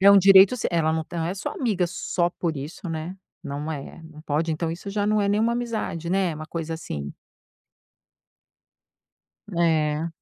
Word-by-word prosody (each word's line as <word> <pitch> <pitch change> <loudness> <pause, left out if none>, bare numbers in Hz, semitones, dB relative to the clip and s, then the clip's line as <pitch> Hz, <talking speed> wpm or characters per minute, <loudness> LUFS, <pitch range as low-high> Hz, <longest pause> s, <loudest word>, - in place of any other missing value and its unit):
é 200 +1 +8
um 200 - +8
direito 195 +4 +7
seu, 235 - -1
ela 160 -2 +2
não 160 0 -1
tá 170 +1 -6
não 165 - 0
é 180 - -2
sua 200 - -4
amiga 205 -9 0
só 175 0 -1
por 170 -2 -3
isso, 150 +6 -6
né. 165 +3 -4 0.3
Não 145 +2 -4
é 145 +2 -8
não 160 -1 -12
pode. 160 +2 0
Então, 160 +1 -2
isso 175 +4 -6
já 205 0 0
não 215 0 +3
é 200 - +1
nenhuma 220 +3 +2
amizade, 220 -8 -3
né, 185 -3 +1
uma 155 +1 -7
coisa 165 0 -4
assim 70 - -5 2.4
É. 160 -2 +2
170 Hz, 180 wpm, -25 LUFS, 160-195 Hz, 2.4 s, é